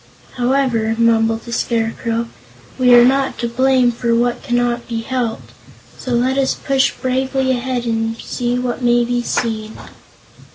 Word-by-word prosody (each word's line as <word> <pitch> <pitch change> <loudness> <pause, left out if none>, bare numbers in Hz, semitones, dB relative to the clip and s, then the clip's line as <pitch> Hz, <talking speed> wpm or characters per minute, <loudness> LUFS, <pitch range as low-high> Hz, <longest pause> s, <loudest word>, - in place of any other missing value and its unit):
"However," 245 -3 +1
mumbled 225 -1 +2
the 235 - -6
Scarecrow, 230 0 -1 0.5
"we 250 -1 +6
are 240 0 +7
not 270 +1 +1
to 235 - -2
blame 255 +1 +2
for 235 0 -1
what 240 +1 0
cannot 240 -1 -1
be 230 -2 -3
helped; 240 -2 -3 0.4
so 255 - -5
let 255 +3 +1
us 270 - +1
push 270 -1 +1
bravely 260 0 0
ahead 250 -1 -2
and 225 -1 -1
see 245 +1 -3
what 250 0 -3
may 240 0 +3
be 245 0 -1
seen." 220 -2 -3
240 Hz, 150 wpm, -18 LUFS, 230-255 Hz, 0.5 s, are